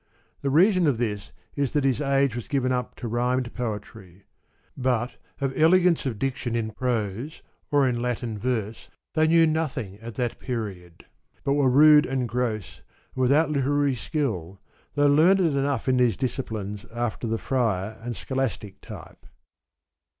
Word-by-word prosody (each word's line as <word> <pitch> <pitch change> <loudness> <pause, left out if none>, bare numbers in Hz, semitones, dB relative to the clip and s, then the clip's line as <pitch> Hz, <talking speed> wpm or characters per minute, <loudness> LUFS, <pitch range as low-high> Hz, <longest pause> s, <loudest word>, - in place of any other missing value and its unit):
The 140 - -1
reason 180 +4 +4
of 135 -5 +2
this 105 -3 -3 0.2
is 140 -3 -1
that 145 -2 +1
his 135 0 +1
age 140 -3 +2
was 120 - -5
given 130 -2 0
up 125 -1 -2
to 120 - -6
rhymed 125 +2 -1
poetry; 105 -5 -6 0.5
but 125 -2 -1 0.2
of 135 -1 -2
elegance 170 -1 +4
of 115 -5 -3
diction 125 0 -2
in 110 -1 -1
prose, 115 +3 -3 0.3
or 145 -3 +3
in 120 -2 -1
Latin 120 -3 -3
verse, 115 -2 -3 0.2
they 155 0 +3
knew 165 0 +5
nothing 135 -11 -2
at 115 0 -9
that 120 -2 -2
period, 100 -9 -6 0.4
but 140 - +1
were 140 -2 +3
rude 150 +3 +7
and 130 -2 -1
gross, 120 -4 -3 0.3
and 130 - -3
without 145 +5 +3
literary 145 0 +1
skill, 110 - -3 0.4
though 145 0 +3
learned 160 +7 +5
enough 140 -6 0
in 130 -1 +3
these 120 -5 +3
disciplines 110 -6 -4
after 120 0 -3
the 115 0 0
friar 110 -5 -1
and 120 0 -4
scholastic 130 -7 -3
type. - - -11
125 Hz, 155 wpm, -25 LUFS, 115-140 Hz, 0.5 s, rude